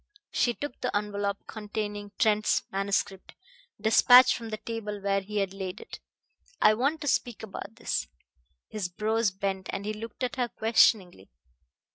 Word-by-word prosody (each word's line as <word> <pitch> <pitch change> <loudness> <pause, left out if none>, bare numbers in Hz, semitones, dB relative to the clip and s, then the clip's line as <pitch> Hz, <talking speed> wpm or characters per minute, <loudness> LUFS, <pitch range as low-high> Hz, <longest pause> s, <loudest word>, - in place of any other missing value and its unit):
She 240 -1 +1
took 290 -3 -7
the 250 - 0
envelop 205 -1 -3
containing 210 -1 -5
Trent's 215 -1 +2
manuscript 195 0 -2 0.4
despatch 245 +4 +7
from 230 -2 -7
the 215 - -4
table 215 -2 -5
where 195 0 0
he 210 +2 -6
had 195 -2 0
laid 190 -2 -5
it. - - -10 0.6
"I 215 - +6
want 280 +8 0
to 290 - -4
speak 240 -4 0
about 200 0 -8
this." 225 - -2 0.6
His 205 -5 -4
brows 220 +4 0
bent, 190 0 -3
and 200 - -4
he 215 - -2
looked 225 +3 -7
at 250 +1 -2
her 250 -1 +1
questioningly. 210 - +2
210 Hz, 155 wpm, -28 LUFS, 195-225 Hz, 0.6 s, despatch